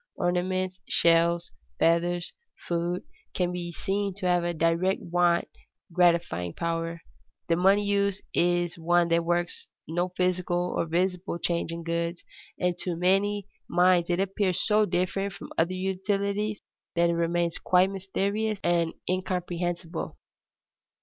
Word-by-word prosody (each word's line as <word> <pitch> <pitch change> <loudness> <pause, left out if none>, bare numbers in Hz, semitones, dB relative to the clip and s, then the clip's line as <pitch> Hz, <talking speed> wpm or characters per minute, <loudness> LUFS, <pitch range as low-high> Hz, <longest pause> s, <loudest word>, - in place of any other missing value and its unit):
Ornaments, 185 +1 -1
shells, 170 +1 +3 0.3
feathers, 170 +1 +1 0.3
food 175 +1 -1 0.3
can 180 -1 +1
be 175 -1 -4
seen 195 +2 -2
to 190 - -6
have 175 -1 +3
a 175 - 0
direct 170 +3 +1
want 175 0 +2 0.5
gratifying 170 - +2
power. 165 0 -2 0.5
The 165 - +4
money 195 +4 +4
use 200 -1 +1
is 175 -1 +1
one 175 +1 +3
that 170 0 +3
works 175 0 -1 0.2
no 175 +3 -1
physical 180 -1 0
or - - 0
visible 180 +2 -1
change 170 -1 -1
in 170 0 -5
goods, 170 +1 -2 0.4
and 180 -1 +1
to 180 -2 -2
many 195 +3 +2 0.2
minds 175 -1 +3
it 175 +1 +1
appears 195 -1 0
so 210 -1 +3
different 185 +2 -1
from - - -10
other 170 +3 +1
utilities 200 +2 -1 0.3
that 170 0 +3
it - - 0
remains 170 0 0
quite 185 +1 +3
mysterious 200 +2 -1
and 170 -1 +1
incomprehensible. 175 -2 -2
175 Hz, 130 wpm, -27 LUFS, 170-190 Hz, 0.5 s, The